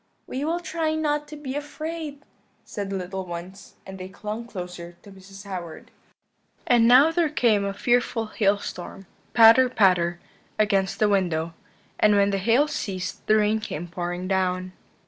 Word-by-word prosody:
"'We 270 Hz, +3 st, -4 dB
will 335 Hz, +2 st, 0 dB
try 325 Hz, -2 st, -2 dB
not 295 Hz, -1 st, -1 dB
to 300 Hz, -, -9 dB
be 285 Hz, -3 st, -6 dB
afraid,' 300 Hz, 0 st, -6 dB, 0.4 s
said 200 Hz, -2 st, -5 dB
the 195 Hz, -, -3 dB
little 190 Hz, +1 st, -4 dB
ones; 180 Hz, +2 st, -9 dB
and 190 Hz, 0 st, -9 dB
they 185 Hz, 0 st, -7 dB
clung 215 Hz, +4 st, -6 dB
closer 180 Hz, -4 st, -8 dB
to 200 Hz, -, -13 dB
Mrs. 195 Hz, +1 st, -13 dB
Howard. 180 Hz, -4 st, -7 dB, 0.7 s
"And 235 Hz, -2 st, +4 dB
now 265 Hz, +6 st, +7 dB
there 330 Hz, -1 st, +1 dB
came 230 Hz, -8 st, +2 dB
a 200 Hz, -, -1 dB
fearful 240 Hz, +2 st, 0 dB
hailstorm, 200 Hz, -3 st, -2 dB, 0.3 s
patter, 230 Hz, +3 st, +7 dB
patter, 180 Hz, -6 st, +2 dB, 0.4 s
against 195 Hz, -3 st, +1 dB
the 215 Hz, -, +3 dB
window; 170 Hz, -5 st, 0 dB, 0.5 s
and 210 Hz, -1 st, +5 dB
when 200 Hz, 0 st, +3 dB
the 195 Hz, -, 0 dB
hail 235 Hz, +9 st, +3 dB
ceased 195 Hz, -11 st, -4 dB
the 215 Hz, -, +5 dB
rain 215 Hz, 0 st, +2 dB
came 175 Hz, -5 st, -6 dB
pouring 175 Hz, +1 st, -4 dB
down. 185 Hz, -1 st, -1 dB
205 Hz, 160 wpm, -24 LUFS, 185-250 Hz, 0.7 s, now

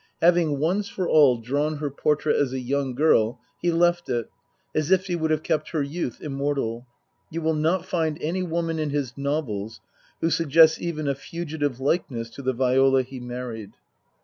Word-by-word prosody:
Having 170 Hz, -4 st, +3 dB
once 185 Hz, +8 st, 0 dB
for 185 Hz, -2 st, -3 dB
all 140 Hz, -5 st, +5 dB
drawn 145 Hz, +7 st, -1 dB
her 145 Hz, -1 st, -3 dB
portrait 150 Hz, +2 st, +1 dB
as 135 Hz, -3 st, +1 dB
a 130 Hz, -, -2 dB
young 135 Hz, 0 st, -2 dB
girl, 120 Hz, -6 st, +3 dB, 0.2 s
he 175 Hz, -, +2 dB
left 175 Hz, 0 st, +2 dB
it, 120 Hz, -3 st, -2 dB, 0.4 s
as 155 Hz, 0 st, 0 dB
if 190 Hz, 0 st, +3 dB
he 180 Hz, -2 st, -1 dB
would 160 Hz, -2 st, -1 dB
have 155 Hz, 0 st, 0 dB
kept 160 Hz, -2 st, -1 dB
her 155 Hz, -3 st, +1 dB
youth 140 Hz, -3 st, -4 dB
immortal. 135 Hz, -4 st, -2 dB, 0.4 s
You 165 Hz, +1 st, -4 dB
will 160 Hz, 0 st, +2 dB
not 165 Hz, +4 st, +1 dB
find 160 Hz, -4 st, -1 dB
any 170 Hz, +5 st, -2 dB
woman 165 Hz, -2 st, -2 dB
of 155 Hz, -1 st, -1 dB
his 140 Hz, -4 st, -2 dB
novels 135 Hz, -7 st, -3 dB, 0.4 s
who 165 Hz, -, +1 dB
suggests 160 Hz, 0 st, +5 dB
even 155 Hz, -3 st, -3 dB
a 140 Hz, -, +2 dB
fugitive 145 Hz, -3 st, -4 dB
likeness 130 Hz, -5 st, -1 dB
to 140 Hz, -, -9 dB
the 130 Hz, -1 st, 0 dB
Viola 130 Hz, +1 st, +3 dB
he 130 Hz, +1 st, -9 dB
married. 120 Hz, -3 st, -6 dB
145 Hz, 180 wpm, -25 LUFS, 130-165 Hz, 0.4 s, all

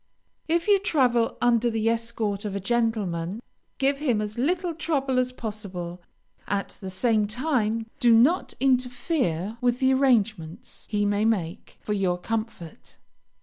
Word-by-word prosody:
If 335 Hz, +3 st, +1 dB
you 405 Hz, -1 st, +5 dB
travel 255 Hz, -, +1 dB
under 240 Hz, 0 st, +3 dB
the 225 Hz, -1 st, -1 dB
escort 225 Hz, -3 st, -1 dB
of 205 Hz, -2 st, -4 dB
a -, -, -1 dB
gentleman, 205 Hz, -4 st, -1 dB, 0.4 s
give 275 Hz, +1 st, +1 dB
him 250 Hz, -8 st, +1 dB
as 210 Hz, 0 st, -4 dB
little 345 Hz, +7 st, 0 dB
trouble 280 Hz, -5 st, 0 dB
as 255 Hz, 0 st, 0 dB
possible; 195 Hz, -7 st, -6 dB, 0.5 s
at 200 Hz, 0 st, -1 dB
the 190 Hz, -, -5 dB
same 215 Hz, +2 st, +1 dB
time, 230 Hz, -2 st, -1 dB
do 240 Hz, -, +4 dB
not 255 Hz, +11 st, +4 dB
interfere 250 Hz, -, 0 dB
with 245 Hz, -1 st, +2 dB
the 260 Hz, 0 st, +3 dB
arrangements 220 Hz, -, 0 dB
he 205 Hz, -1 st, 0 dB
may 205 Hz, +1 st, +1 dB
make 195 Hz, -4 st, -2 dB
for 210 Hz, -, -2 dB
your 190 Hz, -3 st, 0 dB
comfort. 215 Hz, -4 st, -6 dB
230 Hz, 145 wpm, -25 LUFS, 205-255 Hz, 0.5 s, you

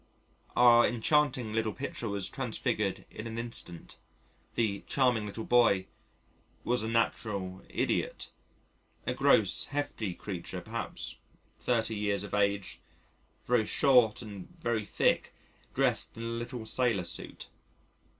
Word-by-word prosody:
Our 120 Hz, -1 st, +7 dB
enchanting 125 Hz, -1 st, +2 dB
little 110 Hz, -1 st, 0 dB
picture 125 Hz, -4 st, -4 dB
was 100 Hz, -2 st, -2 dB
transfigured 110 Hz, -5 st, -2 dB
in 110 Hz, +1 st, -6 dB
an 115 Hz, 0 st, -6 dB
instant. 115 Hz, -7 st, -4 dB, 0.6 s
The 105 Hz, -4 st, +1 dB
"charming 125 Hz, -6 st, +2 dB
little 110 Hz, +2 st, -5 dB
boy" 115 Hz, -7 st, +4 dB, 0.8 s
was 125 Hz, -1 st, +1 dB
a 110 Hz, -, -2 dB
natural 105 Hz, -5 st, -1 dB
idiot -, -, -1 dB, 0.7 s
a -, -, 0 dB
gross, -, -, +3 dB
hefty 125 Hz, -9 st, -3 dB
creature 95 Hz, -5 st, -5 dB
perhaps -, -, -5 dB, 0.4 s
30 115 Hz, -2 st, +1 dB
years 105 Hz, -1 st, 0 dB
of 105 Hz, -, -8 dB
age, 100 Hz, -1 st, 0 dB, 0.7 s
very 115 Hz, -3 st, +2 dB
short 125 Hz, -4 st, +4 dB
and 100 Hz, -4 st, -8 dB
very 115 Hz, -7 st, -1 dB
thick, -, -, +1 dB, 0.4 s
dressed -, -, +1 dB
in 115 Hz, -, -5 dB
a -, -, -3 dB
little 115 Hz, 0 st, -4 dB
sailor 115 Hz, -5 st, +1 dB
suit. 85 Hz, -, -5 dB
115 Hz, 120 wpm, -31 LUFS, 100-120 Hz, 0.8 s, Our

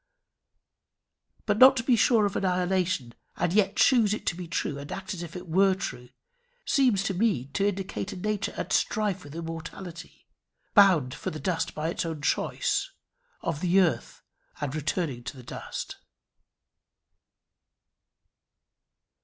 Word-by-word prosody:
But 210 Hz, 0 st, +1 dB
not 265 Hz, +1 st, +9 dB
to 230 Hz, -, 0 dB
be 250 Hz, 0 st, +4 dB
sure 220 Hz, -1 st, +4 dB
of 200 Hz, -, -2 dB
annihilation, 180 Hz, -7 st, 0 dB, 0.2 s
and 175 Hz, -, 0 dB
yet 200 Hz, -1 st, +3 dB
choose 225 Hz, -6 st, +4 dB
it -, -, -9 dB
to -, -, 0 dB
be 180 Hz, -1 st, -7 dB
true, 145 Hz, -3 st, -2 dB
and 140 Hz, +1 st, -8 dB
act 195 Hz, +1 st, -5 dB
as 180 Hz, -, -6 dB
if 170 Hz, 0 st, -8 dB
it 180 Hz, 0 st, -7 dB
were 190 Hz, +3 st, +4 dB
true, 125 Hz, -10 st, -6 dB, 0.6 s
seems 250 Hz, -9 st, +3 dB
to 195 Hz, -, -1 dB
me 180 Hz, -, 0 dB
to 200 Hz, -, +1 dB
indicate 195 Hz, 0 st, -3 dB
a -, -, -7 dB
nature 210 Hz, +2 st, -2 dB
at -, -, -3 dB
strife 210 Hz, -4 st, 0 dB
with 145 Hz, +1 st, -11 dB
immortality 165 Hz, +1 st, -8 dB, 0.5 s
bound 180 Hz, -, +5 dB
for -, -, -4 dB
the 155 Hz, -, -6 dB
dust 165 Hz, +3 st, -2 dB
by 155 Hz, +1 st, -2 dB
its -, -, -2 dB
own 160 Hz, -3 st, -5 dB
choice -, -, 0 dB, 0.5 s
of 165 Hz, -3 st, -2 dB
the 180 Hz, +1 st, +3 dB
earth, 180 Hz, -4 st, 0 dB, 0.4 s
and 145 Hz, -2 st, -3 dB
returning 155 Hz, -4 st, -2 dB
to -, -, -6 dB
the 125 Hz, -, -11 dB
dust." -, -, -6 dB
180 Hz, 150 wpm, -27 LUFS, 160-200 Hz, 0.6 s, not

